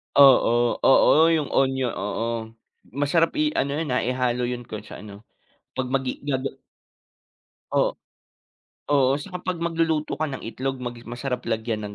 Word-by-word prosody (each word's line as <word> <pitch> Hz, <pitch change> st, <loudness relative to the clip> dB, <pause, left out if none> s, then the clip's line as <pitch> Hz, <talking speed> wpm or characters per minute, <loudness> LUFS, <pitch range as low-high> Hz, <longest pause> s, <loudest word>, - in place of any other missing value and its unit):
Oo. 120 Hz, -4 st, +5 dB
Oo, 155 Hz, +4 st, +5 dB
'yung 150 Hz, -3 st, -1 dB
onyo 130 Hz, -2 st, +1 dB
oo, 115 Hz, +1 st, -3 dB, 0.7 s
masarap 145 Hz, +4 st, +2 dB
i 305 Hz, 0 st, +1 dB
ano 140 Hz, 0 st, 0 dB
'yun, 155 Hz, -2 st, -2 dB
ah, 125 Hz, -, +2 dB
ihalo 125 Hz, 0 st, 0 dB
'yun 120 Hz, 0 st, -4 dB
kung 110 Hz, -3 st, -8 dB
sa -, -, -10 dB
ano, 105 Hz, +1 st, -12 dB, 0.5 s
'pag 130 Hz, -1 st, -3 dB
maggi 130 Hz, -1 st, -2 dB
gaga 135 Hz, -1 st, -1 dB, 1.2 s
O -, -, +1 dB, 0.9 s
oo, 135 Hz, -2 st, +4 dB
saka 180 Hz, +3 st, -7 dB
'pag 185 Hz, -2 st, -2 dB
magluluto 165 Hz, -2 st, 0 dB
ka 155 Hz, -, 0 dB
ng 135 Hz, -, -6 dB
itlog 130 Hz, +3 st, -4 dB
mag 120 Hz, -1 st, -5 dB
masarap 125 Hz, +1 st, -4 dB
lagyan 110 Hz, -1 st, -2 dB
ng 100 Hz, -, -9 dB
130 Hz, 150 wpm, -24 LUFS, 120-145 Hz, 1.2 s, Oo